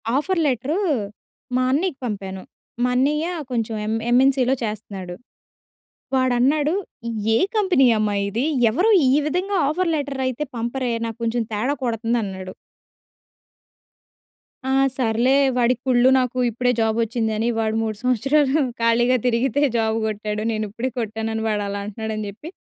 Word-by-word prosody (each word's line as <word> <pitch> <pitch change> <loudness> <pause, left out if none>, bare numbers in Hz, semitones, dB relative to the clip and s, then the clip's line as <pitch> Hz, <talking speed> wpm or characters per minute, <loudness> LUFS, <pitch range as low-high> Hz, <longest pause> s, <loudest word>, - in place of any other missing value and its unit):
Offer 345 +6 0
letter, 275 +4 0 0.8
మా 255 - +2
అన్నియ్యకి 300 +1 0
పంపాను. 195 -4 -5 0.4
మా 250 - +2
అన్నియ్య 300 +5 +1 0.2
కొంచెం 230 -2 -1
ఎం 220 - 0 0.2
ఎంఎన్‌సీలో 260 0 +4
చేస్తన్నాడు. 200 -4 -5 1.0
వాడన్నాడు, 260 +4 +2 0.6
"ఏ - - +5 0.2
కంపెనీ 375 -10 +3
అమ్మా! 215 -1 0
ఇది, 225 +7 -1 0.2
ఎవరూ 360 - +2 0.2
ఈ - - +4
విధంగా 365 +6 -1
ఆఫర్ 335 +4 0
లెటరయితే 270 -2 -2
పంపరే 240 +2 -2
నా 230 - -2
కొంచెం 230 +1 0
తేడా 220 +7 0
కొడతందన్నాడు." 220 -5 -2 2.1
ఆ! 265 - -1 0.3
సర్లే 240 +1 +2 0.2
వాడికి 245 0 +2
కుళ్ళు. 250 0 +5
నాకు 255 0 -2
ఇప్పుడే 245 +2 +1
జాబొచ్చింది 225 0 0
అని. 225 +2 0
వాడు 220 -1 0
3 215 -2 -3
సంవత్సరాలు 275 +4 +2 0.2
ఖాళీగా 240 +2 +3
తిరిగితే 245 +3 +1 0.2
జాబు 220 0 +1
కొట్టాడు. 210 0 -3
నేనుప్పుడే 220 +3 -3
కొట్టానని, 220 0 -3
వాడలా 200 -1 -2
అంటున్నాడని 215 +1 -4
చెప్పి 225 +11 -10
240 Hz, 120 wpm, -22 LUFS, 220-265 Hz, 2.1 s, ఏ